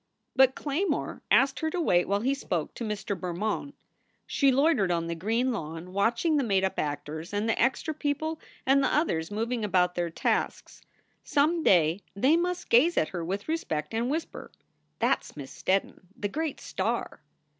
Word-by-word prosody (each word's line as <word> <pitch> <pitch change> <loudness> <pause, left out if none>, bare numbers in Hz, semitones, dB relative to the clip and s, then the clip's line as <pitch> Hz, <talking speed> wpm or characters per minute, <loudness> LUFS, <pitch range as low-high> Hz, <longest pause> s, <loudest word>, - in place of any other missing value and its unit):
But 265 0 +5
Claymore 305 +7 -2
asked 270 0 +4
her 315 - 0
to 360 - -3
wait 180 - +3
while 200 +1 +1
he 265 +4 +1
spoke 175 - -3
to - - -6
Mr. 210 -2 -3
Bermond. 195 +10 -3 0.5
She 275 -2 +3
loitered 275 - +3
on 170 -1 0
the 170 - -2
green 225 +9 0
lawn, 165 -3 -6
watching 235 - +2
the 280 - +2
made 195 -5 +2
up 190 - -1
actors 150 +4 -4
and 210 +2 0
the 225 - +1
extra 265 +6 +1
people 310 +2 -2 0.3
and 275 +1 +4
the - - +2
others 165 - +1
moving 225 +2 -2
about 180 -3 +2
their 175 -1 -1
tasks. 165 - -2 0.4
Some 305 +3 +2
day 170 - +4
they 265 +10 +4
must 355 +1 -1
gaze 295 +9 +5
at 155 - +2
her 175 -3 -4
with 195 +4 -4
respect 160 - -2
and 230 +2 0
whisper, 320 +3 -4 0.5
"That - - +2
s - - -15
Miss 135 -2 -8
Steddon, 190 +1 -1 0.2
the 205 - -2
great 315 +4 -3
star." - - -3
225 Hz, 175 wpm, -28 LUFS, 180-285 Hz, 0.5 s, But